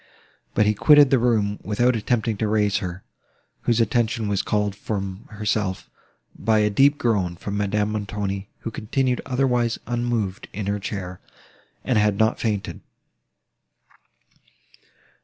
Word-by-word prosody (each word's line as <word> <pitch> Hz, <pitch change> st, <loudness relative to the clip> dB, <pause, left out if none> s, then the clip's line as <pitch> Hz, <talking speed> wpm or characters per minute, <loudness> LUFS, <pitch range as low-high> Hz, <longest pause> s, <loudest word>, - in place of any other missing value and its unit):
But 105 Hz, -, +4 dB
he 105 Hz, -, +3 dB
quitted 145 Hz, +5 st, +6 dB
the 135 Hz, -, +5 dB
room, 110 Hz, -4 st, +1 dB
without 120 Hz, +4 st, +1 dB
attempting 115 Hz, 0 st, 0 dB
to 110 Hz, -, 0 dB
raise 105 Hz, -1 st, +2 dB
her, 95 Hz, -2 st, -5 dB, 0.6 s
whose 120 Hz, -1 st, +2 dB
attention 115 Hz, -1 st, +1 dB
was 100 Hz, -1 st, +1 dB
called 105 Hz, -1 st, 0 dB
from 100 Hz, -2 st, -5 dB
herself, 105 Hz, -3 st, -2 dB, 0.4 s
by 110 Hz, +1 st, +1 dB
a 105 Hz, 0 st, +2 dB
deep 140 Hz, +7 st, +4 dB
groan 100 Hz, -, 0 dB
from 100 Hz, +3 st, -5 dB
Madame 105 Hz, +1 st, 0 dB
Montoni, 100 Hz, -2 st, -3 dB
who 115 Hz, -, -5 dB
continued 125 Hz, +4 st, -1 dB
otherwise 125 Hz, -3 st, +1 dB
unmoved 120 Hz, -5 st, -2 dB
in 100 Hz, +1 st, -4 dB
her 100 Hz, +1 st, -1 dB
chair, 95 Hz, -2 st, -6 dB, 0.6 s
and 125 Hz, -5 st, +2 dB
had 105 Hz, -1 st, +2 dB
not 110 Hz, +2 st, +2 dB
fainted. 105 Hz, -4 st, -2 dB
105 Hz, 135 wpm, -23 LUFS, 100-120 Hz, 0.6 s, quitted